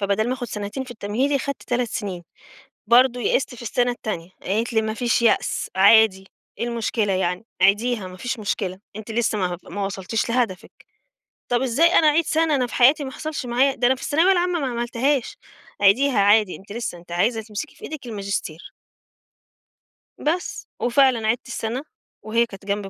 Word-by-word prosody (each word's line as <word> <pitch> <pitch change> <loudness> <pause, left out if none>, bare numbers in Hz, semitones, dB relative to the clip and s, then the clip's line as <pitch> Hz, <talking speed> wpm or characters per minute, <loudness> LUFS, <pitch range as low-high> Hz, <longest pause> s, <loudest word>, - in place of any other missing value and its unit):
فبَدَل 200 +3 0
ما 255 - 0
آخُد 245 -2 -5
سَنتين 210 +6 -5
في 255 - -12
التمهيدي، 245 +6 -1
خدت 280 0 -4
3 245 -1 -1
سِنين. 190 -6 -5 0.6
برضه 245 +2 +4
يئِست 250 +1 0
في 240 - -11
السَنة 245 +2 0
التانية، 210 -8 -5
قالت 225 +5 -1
لي: 220 - +2
"ما 220 0 -2
فيش 235 0 0
يأس 230 - +1
عادي، 195 -1 +5 0.3
إيه - - -1
المشكلة 225 -3 -1
يعني؟ 185 +2 -1 0.2
عيديها 210 +2 +2
ما 185 0 -10
فيش 250 +5 -4
مشكلة، 195 -3 -3 0.2
أنتِ 215 +1 -8
لسّه 220 -1 0
ما 180 -2 -1
هب - - -9
ما 200 0 -2
وصلتيش 195 +4 -2
لهدفِك." 230 -6 -1 0.8
طب 245 0 +1
إزاي 265 +6 +3
أنا 320 - +4
أعيد 325 +3 +3
سَنة؟ 315 -1 +1
أنا 255 -2 +1
في - - -9
حياتي 275 +4 +5
ما 265 - -5
حصلش 305 -2 -5
معايا 260 +3 +2
ده 245 - +1
أنا 260 - +4
في 260 - -12
الثانوية 330 +6 +3
العامة 355 -1 +1
ما 275 - -1
عملتهاش. 240 +2 -1 0.4
عيديها 240 +6 +4
عادي 205 -1 +4
أنتِ 200 +1 -12
لسّه، 230 -6 -4
أنتِ 170 0 -13
عايزة 220 +6 +1
تمسكِ 215 +7 -6
في - - -22
إيدِك 300 -4 -7
الماجستير. 200 -7 -5 1.5
بس. 335 +4 -2
وفعلًا 245 -2 +3
عِدت 235 +2 0
السَنة 235 +3 -4 0.4
وهي 230 +2 +1
كانت 195 -3 -13
جنبي 200 0 -2
235 Hz, 180 wpm, -22 LUFS, 205-255 Hz, 1.5 s, عادي